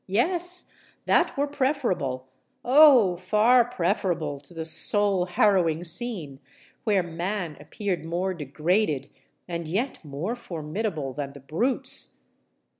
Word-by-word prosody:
—Yes—that 345 - 0
were 285 - +2
preferable—oh! 245 - +2
far 215 +7 +4
preferable 175 - -1
to 140 +2 -16
the 165 -2 -6
soul 195 +2 +3
harrowing 175 -3 +2
scene 170 - -3 0.5
where 205 -4 +2
man 175 0 -4
appeared 180 +5 -4
more 175 +3 -2
degraded 155 0 -1 0.4
and 170 -2 -4
yet 215 - -2
more 155 +9 -4
formidable 165 - -4
than 140 0 -5
the 140 - -11
brutes! 255 - -1
180 Hz, 105 wpm, -25 LUFS, 155-230 Hz, 0.5 s, far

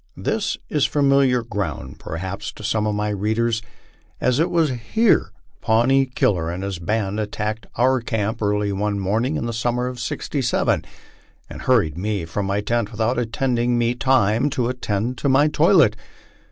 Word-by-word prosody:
This - - -1
is 150 -2 +1
familiar 140 -4 +3
ground 100 - -4
perhaps 95 +5 -5
to 110 - -12
some 110 0 0
of 105 - 0
my 105 0 -1
readers, 110 +3 0 0.6
as 125 +2 +1
it 165 - +2
was 165 -4 +2
here 130 - +2 0.3
Pawnee 130 +5 +3
Killer 90 -9 0
and 90 +3 -4
his 100 -3 -4
band 105 +3 -1
attacked 105 +1 -3
our 130 +1 +2
camp 110 -1 -2
early 105 0 +1
one 100 +1 -1
morning 110 +9 0
in - - -3
the 115 - -3
summer 120 +2 -1
of 125 -1 -5
'67, 125 +2 -1 0.7
and - - -8
hurried 100 - +2
me 100 -3 -2
from 95 +5 -3
my 100 +1 0
tent 115 0 -1
without 115 +3 0
allowing 120 0 0
me 120 0 +2
tirno 125 0 +2
to 125 -4 -1
attend 120 0 -2
to 140 - 0
my 140 +3 +5
toilet. 150 - +4
115 Hz, 165 wpm, -22 LUFS, 105-125 Hz, 0.7 s, my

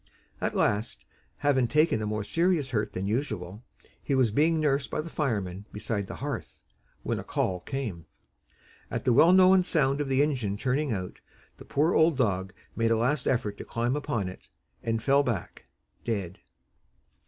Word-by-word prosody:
At - - -1
last, 105 +3 0 0.3
having 135 -4 +2
taken 150 -4 +2
a 105 - -2
more 105 0 -2
serious 165 - +1
hurt 110 -3 -1
than 95 - -3
usual, 105 -3 -3 0.4
he 140 - -1
was 130 -5 +3
being 160 +7 +3
nursed 140 -2 +1
by - - -3
the 160 +2 -5
firemen 105 - -2
beside 105 -1 -3
the - - -7
hearth, - - -6 0.4
when - - -1
a - - -6
"call" 90 -1 -1
came. 105 - -5 0.8
At - - -4
the 125 - +4
well 165 +8 +6
known 185 0 +6
sound 140 -5 +1
of 145 - -2
the 135 +1 +3
engine 125 -9 -1
turning 135 +5 0
out, 95 -4 -4 0.4
the - - -12
poor 155 +5 +1
old 160 -2 +4
dog 95 -7 0 0.2
made 115 +1 +1
a 115 - +3
last 130 +6 0
effort 105 -5 0
to - - -5
climb 120 +3 -1
upon 120 -9 -2
it, 90 - -10 0.3
and 115 -1 -2
fell 140 +1 +4
back 115 -10 -4 0.4
dead. 100 -6 -3
125 Hz, 175 wpm, -28 LUFS, 105-145 Hz, 0.8 s, well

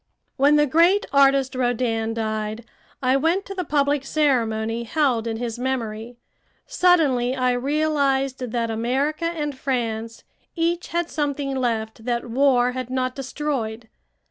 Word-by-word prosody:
When 285 +2 +4
the 295 0 +4
great 340 +8 +3
artist 275 -1 +4
Rodin 235 -3 -1
died, 220 0 -3 0.4
I 255 +1 +3
went 330 +7 +1
to 395 - -6
the 370 -2 -3
public 285 -2 +1
ceremony 235 -6 0
held 245 -3 0
in 225 -1 -2
his 235 0 -4
memory. 240 -2 -3 0.5
Suddenly 300 - +2
I 255 -1 +1
realized 275 0 0
that 235 -2 -2
America 265 +8 -1
and 300 -4 -2
France 230 -4 -3 0.3
each 340 +1 0
had 340 0 -2
something 285 -2 -2
left 225 -3 -2
that 240 0 -1
war 250 -1 +3
had 255 -1 -5
not 255 0 -1
destroyed. 255 -5 -4
260 Hz, 135 wpm, -23 LUFS, 230-290 Hz, 0.5 s, When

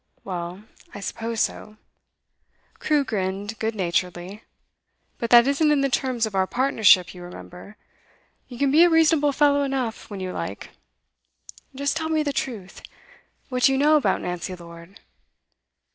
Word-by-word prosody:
'Well, 180 +1 -6 0.3
I - - -6
suppose 225 +3 -3
so.' 215 0 -3 1.0
Crewe 300 -2 +1
grinned 200 0 -3
good 220 0 -2
naturedly. 180 +2 -3 0.8
'But 235 - -3
that 240 0 +7
isn't 280 +3 +2
in 290 -2 +2
the 275 - +1
terms 245 -2 0
of 215 - -6
our 190 -1 +1
partnership, 220 -8 +3
you 180 - -11
remember. 180 +3 -11 0.7
You 245 - -10
can 275 +1 +1
be 315 +4 +6
a 350 - +5
reasonable 320 -3 +3
fellow 285 0 +3
enough, 265 -5 -3
when 200 -2 -7
you 185 -1 -4
like. - - -6 1.0
Just 280 +1 -1
tell 320 -1 -2
me 315 -1 +1
the 285 -2 -2
truth. 220 -9 -5 0.7
What 255 -1 -3
do 270 - +5
you - - +1
know 300 +3 +4
about 300 - +1
Nancy 180 +1 -4
Lord? 170 +2 -13
230 Hz, 155 wpm, -23 LUFS, 190-280 Hz, 1.0 s, that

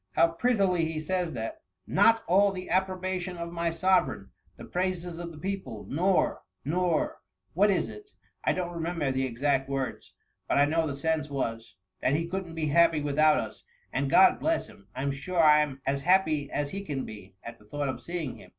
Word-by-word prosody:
How 165 - +4
prettily 190 -2 +1
he 160 -1 -3
says 175 +1 -2
that! 325 0 -5
— - - -57
* - - -53 0.2
Not 225 0 +6
all 195 +3 +4
the 185 -1 -7
approbation 185 -1 -1
of 170 0 -5
my 170 0 -1
sovereign, 185 +3 +1 0.3
the - - -9
praises 180 -2 -2
of 170 -1 -6
the 160 - -12
people' 185 - -5
— - - -14
^nor 180 +6 +2
— 95 - -47
nor 170 +1 0 0.2
— 95 0 -46
what 200 +5 +4
is 185 -4 +1
it? 420 -1 -11 0.3
I - - +2
don't 175 -1 -3
remember 165 -4 -1
the 130 0 0
exact 135 +2 0
words, 135 -1 -4 0.3
but - - +1
I 140 - +6
know 160 +2 +1
the 140 - -3
sense 155 +1 -1
was, 115 -5 -4 0.3
that 135 - +2
he 165 +2 0
couldn't 175 -1 -5
be 160 -1 -1
happy 165 0 +4
with 145 0 -2
out 155 0 +6
us, - - -5 0.3
and, 135 +1 0
God 190 +7 +6
bless 325 +1 0
him 100 - -17
I 130 - -4
I - - -2
'm 140 - 0
sure 170 +6 -3
I 150 -2 +7
'm 135 -3 -4
as 140 +1 0
happy 155 -4 +2
as 145 -1 -2
he 195 - -4
can 145 -9 -4
be, 100 -3 -11
at 115 0 -9
the 105 - -20
thought 145 +5 -3
of 130 - -4
seeing 170 -6 -4
him.' - - -15
165 Hz, 225 wpm, -28 LUFS, 140-185 Hz, 0.3 s, I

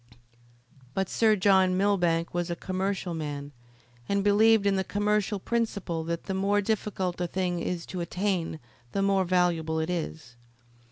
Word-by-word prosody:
But 195 -1 0
Sir 220 -2 +3
John 190 -2 +4
Millbank 175 -4 +1
was 175 0 -1
a 170 - -1
commercial 185 0 -2
man, 145 -3 -5 0.6
and 200 0 +1
believed 210 +1 +5
in 200 -1 +3
the 190 - +1
commercial 210 +1 0
principle 200 -6 -2
that 170 0 -3
the 190 - -4
more 200 +2 +2
difficult 195 -4 -2
a 175 - 0
thing 180 0 -1
is 170 0 -3
to 180 - -5
attain 180 -2 -2 0.3
the 195 - +1
more 195 -1 +2
valuable 170 -3 +1
it 160 +2 -1
is. 160 -7 -5
185 Hz, 155 wpm, -28 LUFS, 170-200 Hz, 0.6 s, believed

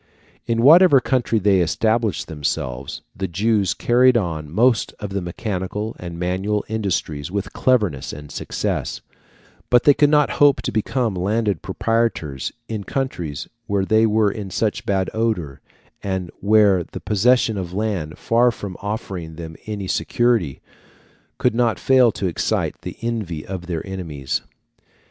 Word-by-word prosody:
In 115 0 +1
whatever 160 0 +8
country 125 -3 0
they 100 -2 +3
established 110 +3 0
themselves, 70 -4 -4
the 95 - -3
Jews 100 +2 +1
carried 125 +1 +4
on 80 -7 -3
most 115 - +2
of 105 -2 -5
the 100 0 -2
mechanical 95 +3 -4
and 85 -2 -7
manual 95 +4 -1
industries 95 -9 -2
with 100 +1 -4
cleverness 105 - +1
and 75 0 -9
success; - - -3 0.7
but 125 -1 +5
they 145 - +7
could 145 +1 +3
not 150 -1 +3
hope 145 -2 +6
to - - -2
become 115 +1 0
landed 100 0 0
proprietors 115 - -1 0.2
in 110 -3 -4
countries 90 - -3 0.2
where 100 -2 0
they 110 +2 +4
were 105 -1 +2
in 100 -1 -6
such 105 +3 -2
bad 95 -2 0
odour, 105 -12 -2 0.4
and 95 -3 -3
where 100 -3 +4
the - - -9
possession 110 +2 +2
of 90 -3 -4
land, 95 -6 -2
far 120 +2 +3
from 100 -5 -6
offering 95 -6 -5
them 80 -1 -8
any 105 -2 -4
security, 115 - 0 0.8
could - - +2
not 115 -4 +1
fail 130 -3 +4
to 100 - -3
excite 90 - -1
the - - -7
envy 105 -10 -3
of 90 -2 -6
their 85 -3 -3
enemies. 80 -9 -4
100 Hz, 145 wpm, -21 LUFS, 90-115 Hz, 0.8 s, whatever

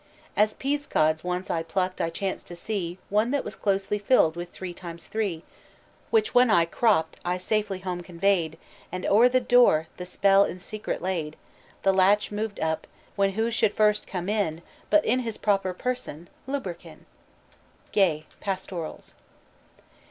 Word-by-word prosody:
"As 215 +1 +3
peascods 265 - 0
once 180 +1 -2
I 165 - 0
plucked 185 +3 -2
I 165 - 0
chanced 190 +3 -4
to 175 - -8
see 180 -2 -3
One 215 +3 +3
that 280 +1 0
was 205 - -6
closely 195 +1 0
filled 200 -7 +3
with 175 0 -6
three 185 -1 -7
times 170 -1 -9
three; 200 -7 -2 0.7
Which 440 -1 +2
when 250 -1 +6
I 170 -6 +5
crop'd, 165 -1 +1
I 180 +1 0
safely 200 0 -1
home 180 -2 -3
convey'd, 175 -2 0 0.3
And 185 0 -4
o'er 230 +5 +6
the 255 +1 +3
door 240 -11 +4
the 180 - -6
spell 195 +1 +4
in 185 - -3
secret 210 0 -5
laid; 165 -5 -2 0.5
The 195 - +4
latch 200 +3 +3
moved 210 0 -3
up, 160 0 -1 0.3
when 195 -1 +2
who 225 +3 0
should 220 -2 +1
first 210 -1 +2
come 180 -1 -4
in, 195 -6 -1 0.3
But 310 0 +4
in 250 +3 +2
his 230 -3 -4
proper 195 -3 +1
person 180 - -4 0.2
Lubberkin." 175 - -6 0.9
GAY: 165 -6 +2 0.2
_Pastorals. 185 -4 -5
195 Hz, 160 wpm, -26 LUFS, 175-215 Hz, 0.9 s, when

